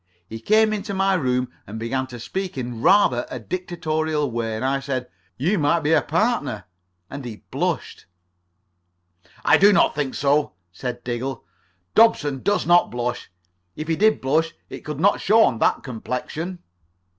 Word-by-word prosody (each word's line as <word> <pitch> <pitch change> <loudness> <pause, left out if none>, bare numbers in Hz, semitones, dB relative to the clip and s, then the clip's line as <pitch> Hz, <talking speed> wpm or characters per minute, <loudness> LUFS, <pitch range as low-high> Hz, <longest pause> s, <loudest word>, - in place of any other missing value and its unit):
He 115 +2 -7
came 215 - +3
into 205 -1 -4
my 195 0 +2
room 125 -7 0 0.2
and 105 - -7
began 130 +4 -2
to 125 -2 -9
speak 190 - -4
in 120 -3 -5
rather 170 -9 +4
a - - -5
dictatorial 155 - -2
way, 115 -1 -2
and 110 - -3
I 135 +1 +1
said, 130 -2 -3 0.3
'You 175 +9 +1
might 155 +3 +2
be 155 +1 +1
a - - +5
partner,' 165 - -1 0.4
and 140 +4 -8
he 115 -4 -8
blushed." - - -3 1.4
"I - - +6
do 200 +2 +7
not 200 - +4
think 145 -3 -2
so," 145 -4 +1 0.2
said 120 +5 -6
Diggle. 125 +1 -4 0.5
"Dobson 150 - +3
does 205 - +1
not 175 +1 +4
blush. 120 0 -4 0.5
If 155 - -6
he 165 - +1
did 220 +5 +3
blush 155 +5 +1 0.2
it - - -6
could 150 -1 -6
not 200 +5 +3
show 225 +3 +5
on 115 - +1
that - - +2
complexion." 140 +8 -5
145 Hz, 165 wpm, -22 LUFS, 125-185 Hz, 1.4 s, do